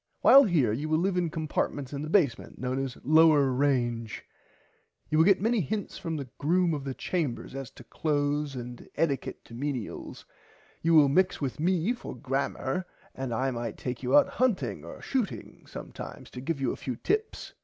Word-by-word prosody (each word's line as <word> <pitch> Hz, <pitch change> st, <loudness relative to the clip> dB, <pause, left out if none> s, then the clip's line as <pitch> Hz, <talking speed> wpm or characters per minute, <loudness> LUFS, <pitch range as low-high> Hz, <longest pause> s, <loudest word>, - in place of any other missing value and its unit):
While 275 Hz, +1 st, +8 dB
here 150 Hz, -, +2 dB
you 145 Hz, +7 st, -3 dB
will 155 Hz, -, +3 dB
live 185 Hz, +3 st, +1 dB
in 175 Hz, -2 st, +1 dB
compartments 150 Hz, -4 st, -2 dB
in 140 Hz, -, -3 dB
the 155 Hz, -, -5 dB
basement 155 Hz, -, +1 dB
known 130 Hz, +2 st, -2 dB
as 130 Hz, -2 st, -5 dB
Lower 155 Hz, -2 st, +5 dB
Range. 120 Hz, -4 st, 0 dB, 0.9 s
You 155 Hz, -, +3 dB
will 160 Hz, -, +6 dB
get 195 Hz, 0 st, +5 dB
many 230 Hz, -1 st, +2 dB
hints 205 Hz, +6 st, -4 dB
from 165 Hz, -1 st, -3 dB
the 140 Hz, -3 st, -5 dB
Groom 170 Hz, +3 st, +2 dB
of 145 Hz, -2 st, -4 dB
the 135 Hz, -1 st, -4 dB
Chambers 155 Hz, -12 st, -2 dB
as 135 Hz, -3 st, -6 dB
to -, -, -14 dB
clothes 145 Hz, +1 st, -1 dB
and 120 Hz, -1 st, -6 dB
[Pg -, -, -15 dB
57] 165 Hz, -, +3 dB
ettiquett 135 Hz, -, -5 dB
to -, -, -15 dB
menials. 130 Hz, -2 st, -5 dB, 0.6 s
You 165 Hz, 0 st, +3 dB
will 150 Hz, -2 st, +8 dB
mix 180 Hz, +7 st, +2 dB
with 140 Hz, 0 st, -3 dB
me 180 Hz, +6 st, +2 dB
for 245 Hz, -, -8 dB
grammer 135 Hz, +5 st, -2 dB, 0.3 s
and 130 Hz, -2 st, -4 dB
I 130 Hz, +4 st, 0 dB
might 120 Hz, -1 st, -4 dB
take 125 Hz, -2 st, -4 dB
you 130 Hz, +2 st, +4 dB
out -, -, +6 dB
hunting 145 Hz, -, 0 dB
or 85 Hz, -, -10 dB
shooting 250 Hz, -8 st, -3 dB
sometimes -, -, -9 dB
to 125 Hz, -, -7 dB
give 155 Hz, +2 st, -2 dB
you 135 Hz, -, 0 dB
a -, -, -4 dB
few 130 Hz, -, -3 dB
tips. 425 Hz, -, -2 dB
145 Hz, 195 wpm, -28 LUFS, 130-165 Hz, 0.9 s, While